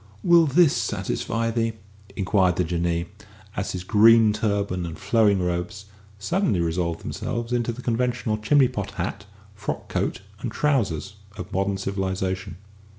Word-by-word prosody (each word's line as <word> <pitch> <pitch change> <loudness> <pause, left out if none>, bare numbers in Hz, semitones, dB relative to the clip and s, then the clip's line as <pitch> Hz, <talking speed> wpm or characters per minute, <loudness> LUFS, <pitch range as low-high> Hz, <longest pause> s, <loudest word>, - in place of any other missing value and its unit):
"Will 170 -2 +6
this 155 +2 +4
satisfy 115 0 -1
thee?" 115 -1 0 0.4
inquired 95 -2 +2
the 90 - +1
Jinnee, 85 0 -1 0.5
as 105 - -3
his 90 -1 -4
green 110 +2 +6
turban 100 -4 -1
and 85 -2 -6
flowing 105 -4 +3
robes 90 +3 -3 0.3
suddenly 170 - 0
resolved 85 0 -1
themselves 120 +1 -4
into 120 -1 0
the 120 +2 -9
conventional 120 -2 0
chimney 130 +5 +4
pot 105 -6 -4
hat, 100 +3 -4 0.3
frock 105 0 -5
coat, - - -2 0.2
and 120 - -4
trousers 105 - 0 0.2
of 90 - -7
modern 95 +1 0
civilisation. 95 -1 -3
100 Hz, 140 wpm, -24 LUFS, 95-115 Hz, 0.5 s, Will